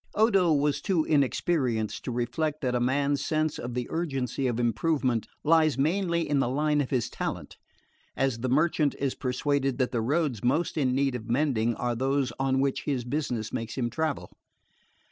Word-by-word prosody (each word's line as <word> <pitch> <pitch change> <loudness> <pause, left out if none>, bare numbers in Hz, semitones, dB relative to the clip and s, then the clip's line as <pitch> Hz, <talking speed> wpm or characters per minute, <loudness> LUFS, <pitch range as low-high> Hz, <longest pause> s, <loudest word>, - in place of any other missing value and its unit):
Odo 195 -5 +4
was 145 -1 +1
too 175 -6 +1
inexperienced 135 -6 0
to - - -2
reflect 145 +6 -2
that 125 -3 0
a 125 - +1
man's 140 +3 +1
sense 155 0 0
of 120 0 -5
the 125 -1 -1
urgency 135 -6 -1
of 120 -1 -1
improvement 120 0 0 0.2
lies 155 -2 +4
mainly 170 +3 +1
in 145 -1 +1
the 130 - +1
line 150 +2 +1
of 135 - -3
his 125 -4 0
talent: - - -5 0.6
as 135 -4 0
the 130 +2 -2
merchant 150 +1 +2
is 135 -2 -1
persuaded 135 0 -1
that 130 -2 0
the 120 -3 0
roads 140 -2 0
most 150 +8 +1
in 130 -5 +1
need 135 -1 +1
of 115 -2 -6
mending 120 -3 +1
are 120 -1 -1
those 135 0 0
on 135 0 +1
which 135 0 0
his 135 -4 -1
business 120 -4 -3
makes 115 0 -4
him 120 -2 -1
travel. 155 +2 -2
135 Hz, 180 wpm, -27 LUFS, 125-155 Hz, 0.6 s, Odo